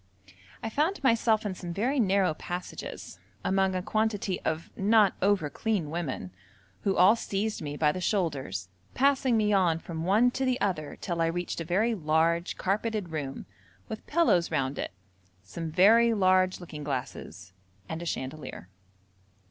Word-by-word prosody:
I 225 Hz, -, -2 dB
found 310 Hz, -, 0 dB
myself 230 Hz, -3 st, +3 dB
in 200 Hz, -, -1 dB
some 175 Hz, -2 st, -7 dB
very 260 Hz, +7 st, 0 dB
narrow 195 Hz, -5 st, +3 dB
passages, 175 Hz, -, -7 dB, 0.3 s
among 190 Hz, 0 st, +2 dB
a 180 Hz, -, -2 dB
quantity 210 Hz, -3 st, -1 dB
of 160 Hz, +1 st, -3 dB
not 205 Hz, 0 st, +4 dB
over 195 Hz, -5 st, +2 dB
clean 185 Hz, -2 st, -2 dB
women, 150 Hz, -, -4 dB, 0.5 s
who 195 Hz, -, +1 dB
all 185 Hz, +5 st, +7 dB
seized 210 Hz, -2 st, -2 dB
me 145 Hz, -1 st, -5 dB
by 150 Hz, -1 st, +3 dB
the 185 Hz, -, -5 dB
shoulders, 140 Hz, -, -1 dB, 0.3 s
passing 265 Hz, -3 st, +3 dB
me 210 Hz, -1 st, +2 dB
on 180 Hz, -5 st, +3 dB
from 165 Hz, -1 st, -6 dB
one 215 Hz, +7 st, +4 dB
to 265 Hz, -, -2 dB
the 255 Hz, -1 st, +1 dB
other 155 Hz, -7 st, -2 dB
till 170 Hz, -2 st, -2 dB
I 165 Hz, -, +3 dB
reached 175 Hz, 0 st, -3 dB
a -, -, -4 dB
very 205 Hz, +8 st, +1 dB
large 165 Hz, -1 st, +1 dB
carpeted 210 Hz, 0 st, -1 dB
room, 145 Hz, -4 st, -5 dB, 0.4 s
with 220 Hz, -, -7 dB
pillows 290 Hz, -, +3 dB
round 135 Hz, -3 st, -1 dB
it, -, -, -3 dB, 0.5 s
some 165 Hz, -, -6 dB
very 225 Hz, +7 st, +5 dB
large 185 Hz, -1 st, +3 dB
looking 160 Hz, -4 st, -8 dB
glasses 100 Hz, -, -5 dB, 0.3 s
and 160 Hz, +1 st, -5 dB
a -, -, -5 dB
chandelier. 130 Hz, -, -5 dB
185 Hz, 155 wpm, -28 LUFS, 160-215 Hz, 0.5 s, all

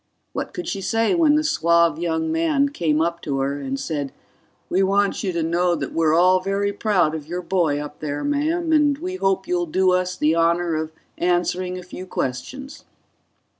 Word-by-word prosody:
What -, -, -4 dB
could 355 Hz, -, -6 dB
she 195 Hz, -, -3 dB
say 225 Hz, -, +1 dB
when 320 Hz, -4 st, +4 dB
the 305 Hz, -, +2 dB
suave 170 Hz, -, +2 dB
young 160 Hz, -, -1 dB
man 315 Hz, -4 st, +2 dB
came 160 Hz, -, 0 dB
up 170 Hz, +1 st, -1 dB
to 140 Hz, -2 st, -2 dB
her 140 Hz, +1 st, -1 dB
and 135 Hz, -1 st, -4 dB
said, 145 Hz, -4 st, -3 dB, 0.6 s
"We 185 Hz, -, +1 dB
want 200 Hz, +2 st, +1 dB
you 190 Hz, -, 0 dB
to 170 Hz, -2 st, -1 dB
know 175 Hz, +2 st, +1 dB
that 145 Hz, -3 st, -5 dB
we're 160 Hz, -1 st, +2 dB
all 185 Hz, +2 st, +5 dB
very 200 Hz, +2 st, -1 dB
proud 195 Hz, -7 st, +1 dB
of 155 Hz, -2 st, -6 dB
your 175 Hz, +2 st, -4 dB
boy 170 Hz, -5 st, +1 dB
up 150 Hz, 0 st, -8 dB
there, 145 Hz, -1 st, -3 dB
ma'am, 320 Hz, +4 st, 0 dB
and 295 Hz, -2 st, +3 dB
we 365 Hz, +4 st, -5 dB
hope 195 Hz, -, 0 dB
you'll 175 Hz, -1 st, 0 dB
do 185 Hz, +3 st, +2 dB
us 180 Hz, 0 st, 0 dB
the 155 Hz, +1 st, +2 dB
honor 170 Hz, +1 st, +2 dB
of 155 Hz, 0 st, -2 dB, 0.3 s
answering 180 Hz, +1 st, 0 dB
a 180 Hz, -, -8 dB
few 180 Hz, +1 st, -9 dB
questions." 265 Hz, -, -5 dB
180 Hz, 195 wpm, -22 LUFS, 160-205 Hz, 0.6 s, all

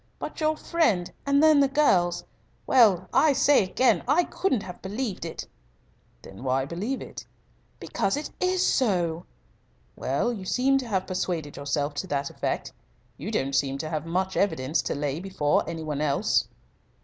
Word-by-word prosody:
But -, -, -7 dB
your 310 Hz, 0 st, +1 dB
friend, 225 Hz, -, +1 dB, 0.2 s
and 280 Hz, +1 st, +4 dB
then 310 Hz, -2 st, +6 dB
the 280 Hz, -, +5 dB
girls 180 Hz, -12 st, +2 dB, 0.4 s
well, 200 Hz, -8 st, +4 dB
I 305 Hz, -2 st, +5 dB
say 285 Hz, -3 st, +4 dB
again, 250 Hz, +7 st, +2 dB
I 305 Hz, +7 st, +4 dB
couldn't 270 Hz, -, -1 dB
have 180 Hz, -1 st, -9 dB
believed 205 Hz, -2 st, -4 dB
it." 165 Hz, -, -6 dB, 0.8 s
"Then 95 Hz, +5 st, -11 dB
why 130 Hz, 0 st, +1 dB
believe 200 Hz, -, -3 dB
it?" -, -, -10 dB, 0.5 s
"Because 195 Hz, +2 st, -1 dB
it 300 Hz, -, -5 dB
is 365 Hz, 0 st, +1 dB
so." 175 Hz, -9 st, +1 dB, 0.7 s
"Well, 140 Hz, -, -1 dB
you 200 Hz, -5 st, -7 dB
seem 265 Hz, +7 st, +2 dB
to 255 Hz, -, -6 dB
have 190 Hz, -4 st, -1 dB
persuaded 175 Hz, -5 st, -3 dB
yourself 145 Hz, +1 st, -2 dB
to 165 Hz, +6 st, -4 dB
that 140 Hz, -4 st, -2 dB
effect. -, -, -3 dB, 0.5 s
You -, -, -5 dB
don't 135 Hz, +1 st, -1 dB
seem 135 Hz, 0 st, +1 dB
to 155 Hz, +3 st, -4 dB
have 155 Hz, 0 st, -3 dB
much 185 Hz, +3 st, -1 dB
evidence 145 Hz, -6 st, +1 dB
to -, -, -3 dB
lay 145 Hz, +1 st, -2 dB
before 170 Hz, -7 st, 0 dB
any 165 Hz, -1 st, -5 dB
one 150 Hz, -2 st, -3 dB
else." 140 Hz, -2 st, +1 dB
185 Hz, 165 wpm, -26 LUFS, -, 0.8 s, then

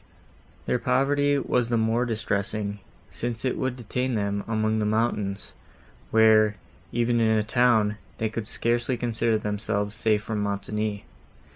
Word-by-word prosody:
Their 125 Hz, -, +1 dB
poverty 140 Hz, +3 st, +2 dB
was 125 Hz, -3 st, 0 dB
the 120 Hz, -, +2 dB
more 115 Hz, +2 st, +1 dB
distressing, 105 Hz, -2 st, -2 dB, 0.3 s
since 120 Hz, 0 st, -4 dB
it 130 Hz, -, +1 dB
would 130 Hz, -1 st, -2 dB
detain 125 Hz, +1 st, -2 dB
them 100 Hz, -1 st, -1 dB
among 110 Hz, 0 st, 0 dB
the 105 Hz, -, 0 dB
mountains, 105 Hz, -3 st, -1 dB, 0.6 s
where, 110 Hz, -1 st, +5 dB, 0.4 s
even 120 Hz, 0 st, +1 dB
in 110 Hz, -1 st, +3 dB
a 105 Hz, -, +2 dB
town, 110 Hz, -2 st, +3 dB, 0.2 s
they 110 Hz, -, 0 dB
could 110 Hz, -1 st, -5 dB
scarcely 120 Hz, +3 st, 0 dB
consider 115 Hz, -1 st, 0 dB
themselves 105 Hz, 0 st, -2 dB
safe 105 Hz, -1 st, +1 dB
from 110 Hz, -1 st, -3 dB
Montoni. 105 Hz, +1 st, -2 dB
110 Hz, 140 wpm, -26 LUFS, 105-120 Hz, 0.6 s, where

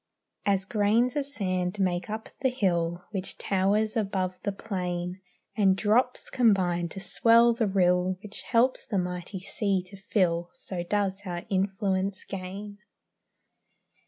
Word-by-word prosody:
As 195 Hz, -1 st, +2 dB
grains 220 Hz, +5 st, +2 dB
of 285 Hz, -2 st, -1 dB
sand 185 Hz, -7 st, -2 dB
make 180 Hz, 0 st, 0 dB
up 220 Hz, +1 st, -5 dB
the 260 Hz, -, +2 dB
hill 175 Hz, -7 st, 0 dB
Which 195 Hz, -3 st, -3 dB
towers 205 Hz, +3 st, +1 dB
above 190 Hz, -4 st, -1 dB
the 200 Hz, -, -1 dB
plain, 180 Hz, -3 st, -4 dB, 0.3 s
And 195 Hz, -3 st, +4 dB
drops 230 Hz, +5 st, +1 dB
combine 185 Hz, -8 st, +2 dB
to 195 Hz, -, -6 dB
swell 230 Hz, +4 st, +5 dB
the 230 Hz, -2 st, 0 dB
rill 180 Hz, -1 st, +2 dB
Which 210 Hz, -1 st, -7 dB
helps 245 Hz, +3 st, +1 dB
the 205 Hz, -, -1 dB
mighty 180 Hz, +1 st, -3 dB
sea 195 Hz, -1 st, 0 dB
to 185 Hz, +2 st, -12 dB
fill, 175 Hz, -3 st, 0 dB
So 185 Hz, -3 st, -5 dB
does 195 Hz, +1 st, -1 dB
our 175 Hz, -1 st, -4 dB
influence 195 Hz, 0 st, 0 dB
gain. 200 Hz, +2 st, -7 dB
195 Hz, 135 wpm, -28 LUFS, 180-210 Hz, 0.3 s, swell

